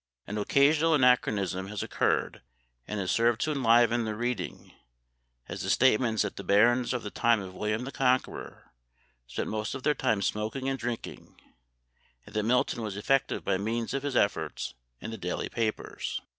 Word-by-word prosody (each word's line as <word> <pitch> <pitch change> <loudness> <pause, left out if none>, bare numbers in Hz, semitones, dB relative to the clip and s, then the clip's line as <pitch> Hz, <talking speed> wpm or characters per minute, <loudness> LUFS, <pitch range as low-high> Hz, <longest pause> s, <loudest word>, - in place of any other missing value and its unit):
An 105 +1 -4
occasional 150 +8 +4
anachronism 105 - +2
has 105 0 -4
occurred, - - 0 0.5
and 105 - -3
has 95 -2 -1
served 115 -1 +2
to 155 - 0
enliven 120 -3 +4
the 110 -1 -3
reading, 120 -5 -4 0.7
as - - -6
the - - -3
statements 120 -3 +3
that 100 - -5
the 100 - -6
barons 120 +6 +3
of 125 -2 -2
the 105 - -5
time 115 -1 +3
of 95 -2 -8
William 105 +4 -2
the 135 - -6
Conqueror 130 -2 -1 0.6
spent - - -4
most 110 +3 -3
of 135 - -7
their 150 - +3
time 110 -8 0
smoking 110 +7 -2
and 135 -1 -1
drinking, 120 0 -6 0.9
and - - -14
that 105 - +2
Milton 120 +2 +1
was 105 -3 -4
effective 135 +6 0
by 95 -1 +1
means 115 +4 -2
of 135 - -1
his 140 -2 -3
efforts 80 -9 0 0.3
in 115 - -6
the 115 - -7
daily 90 -1 -3
papers. 110 -2 -3
115 Hz, 170 wpm, -28 LUFS, 105-125 Hz, 0.9 s, occasional